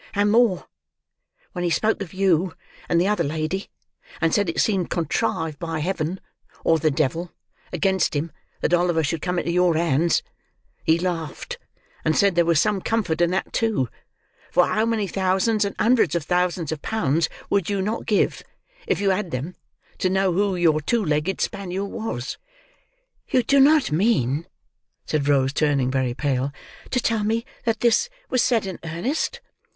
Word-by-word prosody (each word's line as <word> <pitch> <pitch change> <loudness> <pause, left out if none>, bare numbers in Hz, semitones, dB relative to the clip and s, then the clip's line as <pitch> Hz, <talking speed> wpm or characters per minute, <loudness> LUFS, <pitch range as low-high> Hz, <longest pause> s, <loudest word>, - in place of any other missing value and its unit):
"And 205 +1 +3
more. 225 -5 +3 0.9
When 175 - -4
he 175 - +1
spoke 215 +5 +1
of 185 -5 -5
you 185 -2 +1 0.3
and 170 - +3
the 180 - +2
other 210 -4 +1
lady, 155 +6 -3 0.5
and 165 -1 +1
said 205 -4 +2
it 165 - -2
seemed 190 -5 +1
contrived 160 -1 -1
by 165 -1 -3
Heaven, 175 +2 -2 0.4
or 165 -1 +3
the 155 - +2
devil, 160 +4 -1 0.4
against 190 -1 +1
him, 155 +3 -2 0.3
that 170 - 0
Oliver 175 -2 +2
should 155 +1 -2
come 180 +1 -1
into 170 - -1
your 180 -1 +3
hands, 165 0 +2 0.6
he 160 +1 +3
laughed, 175 - -4 0.4
and 155 0 +1
said 200 -2 +4
there 170 0 +3
was 165 -2 +4
some 210 0 +1
comfort 185 -8 0
in 175 - +4
that 185 +2 -2
too, 215 - 0 0.6
for 180 0 +4
how 220 +1 +1
many 225 -3 0
thousands 195 +3 +1
and 200 - -4
hundreds 225 - +3
of 170 - 0
thousands 180 -2 0
of 155 -2 -4
pounds 165 -7 0 0.2
would 200 -3 +1
you 200 -1 0
not 210 +4 -2
give, 210 - +1 0.5
if - - +1
you 200 -1 +2
had 190 -1 -1
them, 150 +5 -4 0.5
to 185 - +1
know 190 0 +2
who 200 +1 +1
your 165 -3 +3
two 225 +7 0
legged 150 +5 0
spaniel 195 0 -2
was." 195 - -5 0.9
"You 255 - +3
do 275 +2 +3
not 290 - +5
mean," 160 - +1 0.6
said 150 -2 -1
Rose, 135 -2 +3
turning 140 -4 +1
very 130 -2 0
pale, 135 -1 -1 0.4
"to 250 - +1
tell 225 -3 0
me 225 +3 0 0.2
that 225 -2 0
this 240 - +3 0.2
was 255 - +3
said 230 -4 +2
in 190 -2 -6
earnest?" 245 - -2
180 Hz, 170 wpm, -23 LUFS, 160-205 Hz, 0.9 s, not